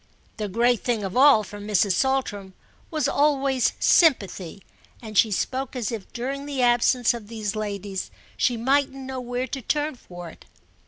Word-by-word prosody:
The 210 Hz, -, -3 dB
great 235 Hz, +4 st, +2 dB
thing 235 Hz, -4 st, -1 dB
of 190 Hz, -1 st, -4 dB
all 265 Hz, -4 st, +6 dB
for 205 Hz, +1 st, -9 dB
Mrs. 205 Hz, -1 st, +1 dB
Saltram 205 Hz, -6 st, -1 dB, 0.3 s
was 310 Hz, -5 st, 0 dB
always 275 Hz, -3 st, +2 dB
sympathy, 200 Hz, -, +2 dB, 0.4 s
and 215 Hz, -2 st, -10 dB
she 220 Hz, -, +5 dB
spoke 260 Hz, +6 st, -2 dB
as 240 Hz, -4 st, -2 dB
if 220 Hz, -4 st, -7 dB
during 275 Hz, +4 st, -4 dB
the 275 Hz, -3 st, -1 dB
absence 240 Hz, 0 st, +3 dB
of 230 Hz, -3 st, -8 dB
these 215 Hz, -2 st, -4 dB
ladies 200 Hz, -2 st, -4 dB, 0.3 s
she 245 Hz, -, +1 dB
mightn't 270 Hz, +3 st, +1 dB
know 265 Hz, -1 st, -6 dB
where 245 Hz, +1 st, -3 dB
to 270 Hz, 0 st, -5 dB
turn 295 Hz, +6 st, -1 dB
for 175 Hz, -8 st, -10 dB
it. -, -, -18 dB
240 Hz, 165 wpm, -24 LUFS, 205-265 Hz, 0.4 s, all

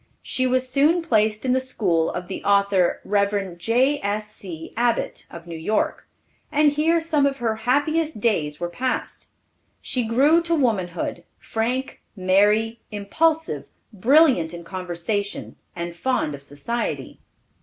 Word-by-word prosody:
She 255 Hz, 0 st, 0 dB
was 255 Hz, 0 st, +1 dB
soon 295 Hz, +6 st, +3 dB
placed 215 Hz, -6 st, +1 dB
in 255 Hz, -, +2 dB
the 260 Hz, -, +3 dB
school 190 Hz, -11 st, 0 dB
of 180 Hz, 0 st, -5 dB
the 190 Hz, -, -6 dB
author, 200 Hz, -2 st, +2 dB
Rev. 200 Hz, -2 st, 0 dB
J.S.C. 210 Hz, -, -1 dB
Abbott, 240 Hz, 0 st, -1 dB
of 170 Hz, 0 st, -10 dB
New 170 Hz, -1 st, -7 dB
York, 165 Hz, +7 st, -1 dB, 0.4 s
and 300 Hz, 0 st, +4 dB
here 320 Hz, +3 st, +2 dB
some 310 Hz, -4 st, +2 dB
of 275 Hz, -1 st, -2 dB
her 225 Hz, -3 st, -1 dB
happiest 310 Hz, +1 st, +1 dB
days 155 Hz, -10 st, 0 dB
were 175 Hz, -, -2 dB
passed. 255 Hz, +9 st, -3 dB, 0.5 s
She 250 Hz, -, -2 dB
grew 275 Hz, +9 st, +4 dB
to 335 Hz, 0 st, 0 dB
womanhood, 185 Hz, -, -1 dB
frank, 245 Hz, +4 st, -3 dB
merry, 210 Hz, +4 st, +2 dB
impulsive, 315 Hz, +11 st, 0 dB, 0.3 s
brilliant 230 Hz, -, +4 dB
in 170 Hz, -, -9 dB
conversation, 185 Hz, +3 st, -4 dB, 0.2 s
and 170 Hz, -1 st, -5 dB
fond 250 Hz, -, -1 dB
of 140 Hz, -, -8 dB
society. 145 Hz, +13 st, -4 dB
220 Hz, 135 wpm, -23 LUFS, 185-265 Hz, 0.5 s, and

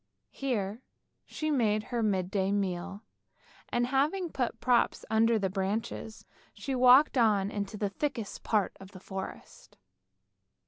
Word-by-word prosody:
Here 220 Hz, -, -2 dB, 0.4 s
she 310 Hz, 0 st, -3 dB
made 215 Hz, -6 st, +2 dB
her 235 Hz, +1 st, -3 dB
midday 190 Hz, -2 st, 0 dB
meal, 195 Hz, +1 st, -2 dB, 0.7 s
and, 240 Hz, 0 st, +1 dB
having 300 Hz, +8 st, 0 dB
put 250 Hz, -3 st, -2 dB
props 245 Hz, -2 st, +2 dB
under 225 Hz, +1 st, +4 dB
the 200 Hz, -2 st, 0 dB
branches, 210 Hz, +3 st, -3 dB, 0.3 s
she 275 Hz, -, -4 dB
walked 255 Hz, +2 st, +6 dB
on 205 Hz, -3 st, +3 dB
into 205 Hz, 0 st, -4 dB
the 205 Hz, -1 st, -1 dB
thickest 230 Hz, 0 st, -4 dB
part 210 Hz, -4 st, 0 dB
of 195 Hz, +1 st, -13 dB
the 185 Hz, -, -10 dB
forest. 190 Hz, 0 st, -8 dB
215 Hz, 130 wpm, -30 LUFS, 195-250 Hz, 0.7 s, walked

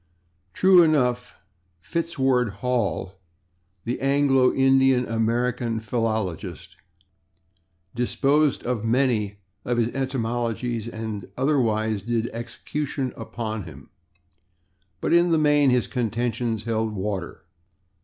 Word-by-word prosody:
True 185 Hz, -1 st, +6 dB
enough, 125 Hz, -7 st, +1 dB, 0.4 s
Fitzedward 130 Hz, -, 0 dB
Hall, 105 Hz, -6 st, -1 dB, 0.6 s
the 120 Hz, +2 st, -3 dB
Anglo 135 Hz, -2 st, +3 dB
Indian 135 Hz, -1 st, +3 dB
American 115 Hz, +1 st, 0 dB
philologist, 110 Hz, -5 st, -3 dB, 1.2 s
disposed 140 Hz, +4 st, +1 dB
of 120 Hz, -3 st, -2 dB
many 115 Hz, -4 st, +1 dB, 0.3 s
of 120 Hz, -1 st, -1 dB
his 115 Hz, -1 st, +2 dB
etymologies 120 Hz, -3 st, -2 dB
and 110 Hz, -4 st, -6 dB
otherwise 110 Hz, -6 st, +1 dB
did 115 Hz, +2 st, -1 dB
execution 130 Hz, +3 st, -4 dB
upon 110 Hz, -3 st, -5 dB
him, 70 Hz, -5 st, -13 dB, 1.1 s
but -, -, 0 dB
in 170 Hz, +1 st, +5 dB
the 165 Hz, -, +3 dB
main 145 Hz, -2 st, +4 dB
his 125 Hz, -1 st, +2 dB
contentions 115 Hz, -2 st, -2 dB
held 110 Hz, -1 st, -1 dB
water. 95 Hz, -2 st, -4 dB
120 Hz, 95 wpm, -24 LUFS, 110-135 Hz, 1.2 s, True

